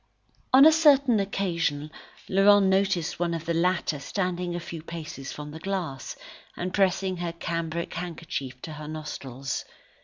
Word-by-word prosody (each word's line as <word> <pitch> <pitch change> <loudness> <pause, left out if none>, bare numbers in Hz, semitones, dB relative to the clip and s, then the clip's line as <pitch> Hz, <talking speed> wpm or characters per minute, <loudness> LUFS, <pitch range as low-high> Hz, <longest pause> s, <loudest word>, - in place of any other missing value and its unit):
On 270 +2 +9
a 315 - +9
certain 280 -7 +5
occasion 170 -7 -1 0.4
Laurent 200 +1 +6
noticed 190 -4 +1
one 170 -1 0
of 165 -1 -5
the 170 - 0
latter 170 -3 +1
standing 180 +2 -2
at - - -1
a 170 - -10
few 165 -2 -6
paces 155 -5 -7
from 150 0 -7
the 160 - -8
glass, 175 -8 -4 0.4
and 180 +1 -3
pressing 190 -1 +2
her 170 -1 -2
cambric 170 0 -3
handkerchief 160 -7 -5
to 155 - -6
her 150 0 -8
nostrils. 140 -4 -5
170 Hz, 155 wpm, -27 LUFS, 155-190 Hz, 0.4 s, On